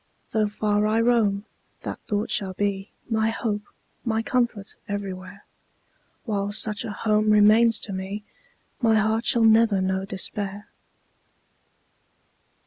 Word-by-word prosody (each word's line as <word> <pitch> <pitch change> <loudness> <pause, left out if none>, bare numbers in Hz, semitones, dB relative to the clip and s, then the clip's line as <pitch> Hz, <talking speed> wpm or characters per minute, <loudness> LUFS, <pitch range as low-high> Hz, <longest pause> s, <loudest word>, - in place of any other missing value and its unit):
Though 215 -1 +2
far 210 0 0
I 220 +1 +2
roam, 220 -4 +2 0.4
that - - -5
thought 210 0 -1
shall 190 -2 -1
be 200 0 -2 0.2
My 220 -1 +1
hope, 220 -2 -2 0.4
my 225 -2 0
comfort 235 -5 -1
everywhere; 195 -1 -6 0.8
While 205 -3 -1
such 210 0 0
a 230 - -5
home 215 0 +1
remains 215 +2 +6
to 200 - -4
me, 190 +2 -5 0.6
My 225 -2 +4
heart 220 +2 +1
shall 235 - +3
never 220 -2 +5
know 190 0 -1
despair. 195 +1 -3
210 Hz, 125 wpm, -24 LUFS, 200-225 Hz, 0.8 s, remains